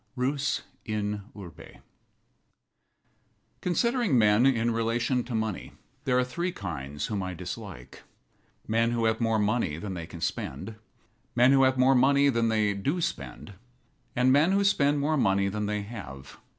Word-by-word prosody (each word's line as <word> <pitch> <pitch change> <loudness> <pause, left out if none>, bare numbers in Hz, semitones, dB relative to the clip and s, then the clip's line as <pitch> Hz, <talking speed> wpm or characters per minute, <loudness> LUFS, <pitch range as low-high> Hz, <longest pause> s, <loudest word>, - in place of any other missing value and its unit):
RUS 135 +2 -1 0.2
IN 105 -1 -3 0.2
URBE 90 -7 -11 1.8
Considering 235 - +1
men 105 +3 +5
in 120 -3 +2
relation 115 +2 0
to 120 -1 -4
money, 110 -3 -3 0.3
there 125 -1 +2
are 125 - +3
three 170 +8 -3
kinds 75 - -5
whom 100 -2 -3
I 95 -1 -4
dislike: 90 - -8 0.7
men 115 +2 +1
who 115 -1 0
have 110 +1 +1
more 115 -1 +2
money 105 -7 0
than 95 +3 -5
they 85 -2 -6
can 85 - -10
spend; 80 +5 -4 0.6
men 125 +2 +5
who 135 -1 +5
have 130 0 +2
more 130 +1 +5
money 140 +2 +4
than 115 -3 +1
they 105 -2 +1
do 140 - -2
spend; 130 -9 -5 0.6
and 125 +1 +3
men 155 +7 +4
who 200 +1 +3
spend 145 -7 +3
more 155 +2 +1
money 100 -5 +2
than 105 +1 -3
they 105 0 -2
have. 90 - -10
115 Hz, 155 wpm, -27 LUFS, 100-130 Hz, 1.8 s, men